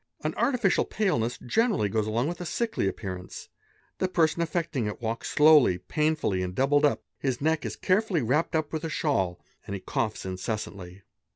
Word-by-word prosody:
An - - -1
artificial 245 -8 +2
paleness 125 - 0
generally 210 - +1
goes 110 +1 -1
along 115 +5 0
with 175 +2 -4
a - - -4
sickly 225 - -1
appearance; 95 -2 -6 0.5
the 185 - +1
person 170 -2 +2
affecting 165 -7 -1
it 105 - -5
walks 115 0 -3
slowly, 150 - +6
painfully, 150 - 0
and 90 0 -4
doubled 145 +4 +3
up; 145 - +1 0.2
his 130 -3 -1
neck 160 +1 0
is; - - -5
carefully 185 - +1
wrapped 150 +8 +1
up 155 -1 -1
with 160 0 -2
a 165 - -2
shawl 95 - 0 0.3
and 100 - -3
he - - -4
coughs 110 +2 -2
incessantly. 95 -1 -5
140 Hz, 175 wpm, -27 LUFS, 105-165 Hz, 0.5 s, slowly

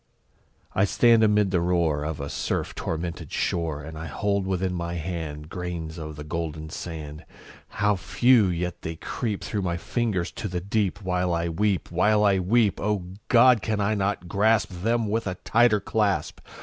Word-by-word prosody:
I 95 - +2
stand 115 +2 +4
amid 105 -2 +3
the 90 -3 +2
roar 85 -4 +1
Of 75 0 -4
a 70 - -4
surf - - -2
tormented 80 -1 -4
shore, 80 -4 -1
And 80 +2 -8
I 80 - -5
hold 100 +5 -1
within 95 -1 -1
my 85 -1 -3
hand 80 -3 -5
Grains 85 -1 -5
of 75 -1 -6
the 75 - -7
golden 80 -1 -4
sand 75 -2 -7 0.4
How 105 0 +1
few! 105 +6 +4
yet 90 0 -2
how - - -4
they 80 - -5
creep 105 +5 -4
Through 105 - -2
my 85 -2 -1
fingers 105 -3 -1
to - - -5
the 90 -2 -3
deep, 100 +1 -1
While 90 -1 0
I 85 0 -1
weep 95 +2 0
while 105 +5 +3
I 100 -2 +4
weep! 105 +3 +2
O 100 -4 -1 0.2
God! 120 -1 +6
can 110 -1 -1
I 100 +1 +1
not 100 -3 -1
grasp 105 +2 +2
Them 110 +5 0
with 110 +1 -1
a 90 - -2
tighter 115 +2 +3
clasp? 100 -5 0
90 Hz, 180 wpm, -25 LUFS, 85-105 Hz, 0.4 s, God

